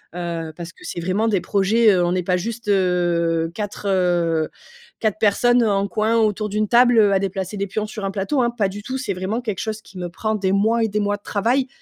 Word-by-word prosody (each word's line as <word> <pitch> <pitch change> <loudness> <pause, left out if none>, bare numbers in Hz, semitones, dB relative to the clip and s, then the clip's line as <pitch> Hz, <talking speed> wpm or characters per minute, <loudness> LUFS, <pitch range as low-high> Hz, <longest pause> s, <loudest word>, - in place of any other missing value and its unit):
Heu, 165 -2 -4
parce 170 -1 -7
que - - -19
c'est 170 - -5
vraiment 190 +6 0
des 200 -5 +1
projets, 210 +4 +3
heu, 180 -2 +2
on 175 +1 0
est 180 - -1
pas 180 +1 +1
juste, 230 +3 -5
heu, 175 -4 +1
4, 210 -1 -6
heu, 175 -4 +1 0.5
4 215 -1 0
personnes, 240 +4 +3
heu, 225 - +2
en 200 0 +1
coin 220 +2 +1
autour 215 -1 +1
d'une 210 0 -1
table, 245 0 +5
heu, 205 -2 +5
à 195 - +3
déplacer 195 +1 -3
des 200 0 -2
pions 215 +3 -3
sur 215 -1 -6
un 195 - -2
plateau, 205 +8 0
hein. 235 - +2
Pas 220 -5 -1
du 205 +2 -7
tout 260 +5 -4
c'est 255 -7 -3
vraiment 190 +6 -3
quelque 215 -6 -4
chose 220 0 -4
qui 195 - -15
me 180 -1 -4
prend 215 +5 -2
des 195 -2 0
mois 225 +3 +2
et - - 0
des 210 0 -1
mois 205 0 0
de 205 - -33
travail. 245 +6 0
200 Hz, 250 wpm, -21 LUFS, 185-220 Hz, 0.5 s, table